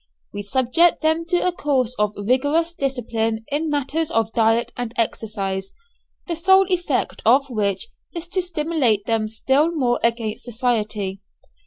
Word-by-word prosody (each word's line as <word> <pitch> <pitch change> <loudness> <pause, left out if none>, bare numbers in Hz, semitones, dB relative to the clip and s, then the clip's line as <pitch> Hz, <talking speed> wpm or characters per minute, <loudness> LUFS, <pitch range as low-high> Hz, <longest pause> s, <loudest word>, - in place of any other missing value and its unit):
We 205 - -4
subject 260 +12 +2
them 320 +1 +1
to 350 +1 +1
a 365 - +3
course 265 -7 0
of 210 0 +1
rigorous 285 +10 +1
discipline 225 -6 -2
in 305 +2 0
matters 295 +2 -1
of 225 0 0
diet 225 +1 +2
and 245 -2 -4
exercise, 195 -4 -2 0.5
the 340 - -3
sole 380 +4 +5
effect 350 -7 -1
of 265 +4 +3
which 210 - -1 0.2
is 340 -1 -6
to 375 0 0
stimulate 300 - 0
them 225 -1 0
still 265 +8 +1
more 255 -8 0
against 230 -2 -1
society. 215 -5 -2
250 Hz, 145 wpm, -22 LUFS, 220-320 Hz, 0.5 s, sole